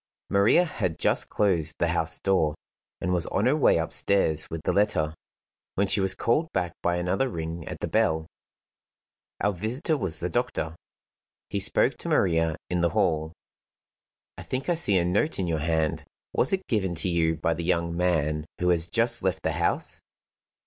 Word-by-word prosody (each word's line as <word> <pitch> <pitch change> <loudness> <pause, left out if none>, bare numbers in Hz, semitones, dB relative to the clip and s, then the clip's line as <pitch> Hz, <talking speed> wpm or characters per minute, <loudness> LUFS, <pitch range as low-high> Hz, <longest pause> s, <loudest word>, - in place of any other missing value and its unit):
Maria 100 - +4
had 95 - -3
just - - 0
closed 85 -7 +1
the - - +1
house - - 0
door, 80 -6 +1 0.4
and 90 - -2
was 85 -2 +1
on 100 - 0
her 130 +4 +4
way 155 - +4
upstairs 80 -1 +2
with 80 - -4
the - - +1
letter, 85 -7 +1 0.6
when 100 - +2
she 100 +1 +2
was 95 -1 +3
called 155 +8 0
back 90 -2 -1
by 85 0 +1
another 90 +9 0
ring 80 -3 -5
at - - -6
the - - -1
bell. 80 0 +1 1.2
Our 105 - +2
visitor 120 - -1
was 95 - -1
the 90 - -1
doctor. 90 -6 -2 0.8
He - - -1
spoke - - +2
to - - -5
Maria 80 -3 +2
in 90 -1 -1
the 85 - +3
hall: 80 0 +1 1.1
"I - - -6
think 130 +5 -4
I - - +4
see 105 - +2
a 85 - +2
note 105 - +1
in 95 - -1
your 80 -2 -1
hand. 80 0 0 0.3
Was 130 - +1
it 190 -1 -1
given 95 -6 -1
to 80 - 0
you 85 -2 +1
by 80 +1 0
the 85 +1 -5
young 85 -1 0
man 80 -3 0
who 90 - +1
has 85 -1 +3
just 115 +5 +1
left 95 -2 -1
the - - +1
house?" - - -1
90 Hz, 185 wpm, -26 LUFS, 80-105 Hz, 1.2 s, Maria